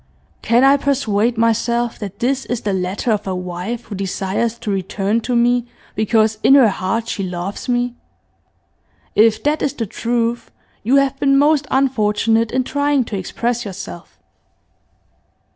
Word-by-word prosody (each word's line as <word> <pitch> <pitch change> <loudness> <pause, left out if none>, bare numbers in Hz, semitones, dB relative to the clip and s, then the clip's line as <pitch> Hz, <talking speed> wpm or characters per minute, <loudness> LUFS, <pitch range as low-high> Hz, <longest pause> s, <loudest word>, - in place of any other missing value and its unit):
Can 235 +3 +3
I 275 +1 +6
persuade 240 -5 0
myself 230 +1 0
that 200 -2 -7
this 265 +4 -1
is 245 -2 -2
the 205 - -1
letter 190 +6 -1
of 210 -2 -1
a 190 - -1
wife 180 +6 -5
who 215 - -9
desires 195 +4 -2
to 230 -3 -4
return 195 +3 -1
to 245 +2 -2
me 240 0 +2 0.3
because 220 0 +1
in 270 - +6
her 260 -6 +6
heart 200 +4 -2
she 210 - -3
loves 185 +4 -5
me? 245 0 0 1.2
If 220 0 +3
that 295 +1 +1
is 285 - 0
the 230 - -2
truth 235 +2 -2 0.3
you 245 +6 +2
have 275 -1 +2
been 275 -1 +3
most 290 0 +3
unfortunate 225 -4 +1
in 255 - +1
trying 285 0 +1
to 225 - -6
express 235 +5 -2
yourself. 195 -3 -9
230 Hz, 155 wpm, -19 LUFS, 205-245 Hz, 1.2 s, I